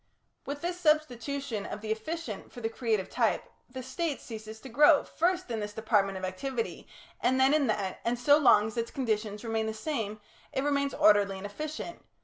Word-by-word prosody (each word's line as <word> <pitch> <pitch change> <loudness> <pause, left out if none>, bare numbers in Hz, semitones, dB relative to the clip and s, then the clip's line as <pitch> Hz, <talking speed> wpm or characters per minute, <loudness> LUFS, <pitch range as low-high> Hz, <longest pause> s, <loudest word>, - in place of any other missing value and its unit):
With 285 +3 -5
this 350 +1 -2
substitution 280 - 0
of 210 - -6
the 215 0 -3
efficient 220 - -4
for - - -9
the 225 -1 -1
creative 225 -4 -1
type, - - +1 0.3
the 255 0 -7
State 285 +4 -2
ceases 220 -1 -8
to - - -9
grow, 295 +5 +6
first 355 -4 0
in 225 - -1
this 210 0 -4
department 205 -3 +1
of 185 - -3
activity, 230 +6 -4 0.3
and 260 +1 +2
then 265 +2 +5
in 300 -3 +3
that, 200 -3 -1
and 235 +1 0
so 285 +5 +5
long 210 -7 +6
as 220 +2 -6
its 230 0 -1
conditions 215 -4 -2
remain 225 -1 -1
the 220 - -3
same 220 -4 -3 0.3
it 270 - 0
remains 280 -1 +1
orderly 205 -2 +4
and 190 - -7
efficient. 310 +10 -6
235 Hz, 190 wpm, -29 LUFS, 215-285 Hz, 0.3 s, grow